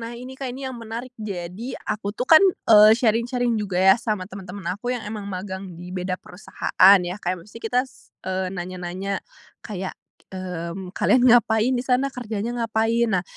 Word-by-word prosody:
Nah, 230 +1 -6
ini 255 +2 -9
Kak, 265 -1 -5
ini 265 +2 -7
yang 260 - -5
menarik, 235 +2 -7
jadi 195 +4 -5
aku 210 -1 -3
tuh 250 - -1
kan, 315 +4 +8 0.3
eee, 215 0 +9
sharing-sharing 235 +1 +1
juga 190 -3 -3
ya, 190 0 +7
sama 210 -5 -2
temen-temen 190 -1 -9
aku 225 +5 -7
yang 235 - -5
emang 210 -1 -6
magang 190 0 -5
di 180 +1 -9
beda 185 0 -2
perusahaan, 195 +1 +3
ya. 180 +2 -4
Kayak 175 -1 -3
maksudnya, 230 +2 -12
eee, - - -18
kita 250 +2 +3 0.8
nanya-nanya 180 +2 -5 0.5
kayak, 190 -4 -5 0.4
mmm, 180 0 -5
kalian 250 -2 +3
ngapain 230 +1 +4
di 245 - -2
sana? 260 +2 +2
Kerjanya 235 -2 -4
ngapain? 225 0 +1
Nah, - - -10
210 Hz, 170 wpm, -23 LUFS, 185-240 Hz, 0.8 s, eee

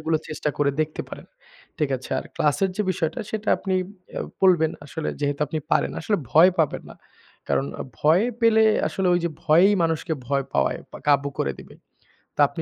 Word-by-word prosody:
এগুলো 160 0 +1
চেষ্টা 155 -1 -2
করে 145 -1 +3
দেখতে 155 0 -2
পারেন, - - -10 0.5
ঠিক 150 -4 0
আছে। 130 - -12
আর - - -5
ক্লাসের 170 +6 +1
যে 210 - +1
বিষয়টা 175 +3 -2
সেটা 215 0 -4
আপনি 190 -2 -2 0.4
অ্যা - - -4 0.2
বলবেন 170 -4 +5 0.2
আসলে 160 +2 -4
যেহেতু 145 0 -1
আপনি 155 +3 -3
পারেন। - - +2
আসলে 205 +5 0 0.2
ভয় 170 +4 +7
পাবেন 155 -3 +1
না, - - -11 0.5
কারণ 70 0 +1 0.3
ভয় 160 +7 +4 0.2
পেলে 225 -1 +5 0.2
আসলে 190 -1 -1
ওইযে 170 -1 0 0.2
ভয়েই 175 +6 +5
মানুষকে 165 0 -1
ভয় 140 0 0
পাওয়ায় 70 - +1
বা - - -8
কাবু 140 0 +3
করে 70 - 0
দিবে। - - -13 0.6
তো - - -25
আপনি - - -7
160 Hz, 180 wpm, -24 LUFS, 145-185 Hz, 0.6 s, ভয়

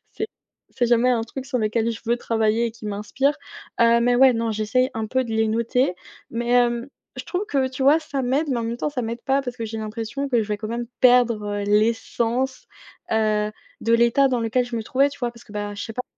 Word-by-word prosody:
c'est 435 - -3 0.4
c'est 245 -2 0
jamais 240 +1 +3
un 230 -2 +1
truc 260 +3 -7
sur 260 -2 -2
lequel 220 +1 0
je 225 - -6
veux 235 +1 +2
travailler 225 0 +1
et - - -3
qui 225 - -14
m'inspire, 210 +8 0 0.5
heu, 235 0 +5
mais 245 +1 +3
ouais, 260 0 +7
non, 230 0 -1
j'essaye 220 +5 +1
un 220 -1 -2
peu 260 +3 0
de 230 - -7
les 220 0 +2
noter. 235 -2 +1 0.4
Mais, 235 +1 -3
hem, 240 +1 +2 0.3
je - - -6
trouve 380 +3 -3
que 270 -7 +1
tu 260 +1 -5
vois, 295 +4 +6
ça 290 -3 -4
m'aide, 275 +5 0
mais 245 - 0
en - - -2
même 230 +1 -3
temps 295 - -2
ça 265 - -3
m'aide 230 +1 -5
pas, 275 +1 +2
parce 250 -1 -6
que 230 - -4
j'ai 220 0 -5
l'impression 225 +6 -4
que 240 -4 +2
je - - -6
vais 210 - -1
quand 215 0 -5
même 235 +1 -3
perdre, 245 -4 +5 0.2
heu, - - -3
l'essence, 230 +4 0 0.5
heu, 215 -1 +1 0.3
de 230 - +1
l'état 235 +4 +4
dans 250 -2 0
lequel 230 +2 +1
je 240 -1 -4
me 225 - -2
trouvais, 275 +4 +2
tu 285 - -12
vois, 245 -3 -1
parce 235 - -15
que, 210 - -15
bah, 205 0 -4
je 205 - -6
sais 225 - -7
pas 250 - -2
235 Hz, 250 wpm, -23 LUFS, 225-255 Hz, 0.5 s, ouais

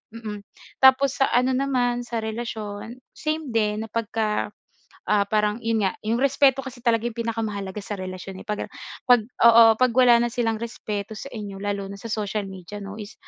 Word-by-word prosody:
Mm, 210 -3 -6 0.4
tapos 265 +1 +5
sa 270 - +5
ano 250 +2 +3
naman, 250 -2 +1
sa 230 -2 -3
relasyon, 220 +1 -5
same 310 -3 -3
din 215 -1 0
na 225 - -13
pagka, 220 -1 -1 0.6
ah, 210 -1 +3
parang, 210 0 +1
'yon 225 -1 +1
nga, 190 - 0
'yong 230 +2 +1
respeto 275 -1 +3
kasi 250 -2 -8
talaga 235 -1 +2
'yong 240 - -4
pinakamahalaga 215 -4 -3
sa 210 - -4
relasyon, 185 0 -7
eh. - - -51
Pag, 210 - -2
ah, - - -22 0.4
pag 245 -2 +6 0.2
oo, 235 0 +9 0.2
'pag 255 -2 +3
wala 245 -2 +6
na 240 - +2
silang 225 -3 0
respeto 215 -2 -5
sa 245 +6 -7
inyo 205 -4 -7
lalo 200 -1 -2
na - - -6
sa 230 - -7
social 210 -1 -2
media, 190 +2 -9
'no, 200 +1 -7
is, 210 -1 -8
225 Hz, 190 wpm, -24 LUFS, 210-245 Hz, 0.6 s, oo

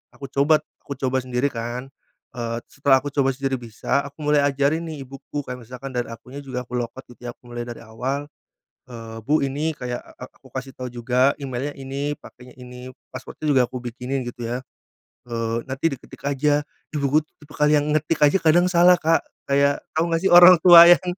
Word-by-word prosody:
Aku 140 -2 -9
coba 150 +3 +3 0.2
aku 140 - -7
coba 130 0 0
sendiri 125 +2 -1
kan, 120 +3 -5 0.4
eee, 115 -1 -3
setelah 140 -1 +3
aku 145 - -4
coba 135 -2 +2
sendiri 135 -1 -2
bisa, 115 +3 -2
aku 145 +2 -11
mulai 150 0 +4
ajarin 140 +4 +1
nih, 150 -4 -6
ibuku. 135 +2 -7
Kayak 125 - -6
misalkan 130 +2 -7
dari 120 -1 -2
akunnya 125 +4 -9
juga 125 -2 -5
aku 125 - -14
log 120 - -2
out, 130 - -12
gitu. - - -17
Aku 120 - -13
mulai 120 0 -4
dari 120 -1 -8
awal. 130 +6 -4 0.6
Eee, 115 -2 -9
"Bu. 150 +2 +3
ini 145 +4 -1
kayak, 125 -3 -5
eee, - - -17
ak 125 - -7
aku - - -15
kasih 130 0 -6
tau 125 - -6
juga 125 +3 +2
emailnya 135 +2 -4
ini, 140 +2 -4
pakenya 125 0 -15
ini, 125 +1 -10 0.2
password-nya 130 +4 -9
juga 135 -3 +4
aku 125 +1 -7
bikinin, 125 +2 -4
gitu 120 -1 -8
ya, 125 - -2 0.7
eee, 115 -1 -2
nanti 135 +4 -1
diketik 135 - -10
aja". 145 +1 +1 0.3
Ibuku 145 +1 +2
tu - - -43
tipikal 150 0 0
yang 150 0 +2
ngetik 155 +1 0
aja 145 +6 +5
kadang 175 +2 +4
salah, 175 +1 +6
Kak. 165 -1 +1 0.2
Kayak, 140 0 +2 0.2
tau 165 - +3
nggak 165 0 0
sih, - - +3
orang 175 +1 +10
tua 170 -2 +11
yang 175 +1 +6
135 Hz, 200 wpm, -22 LUFS, 125-145 Hz, 0.7 s, tua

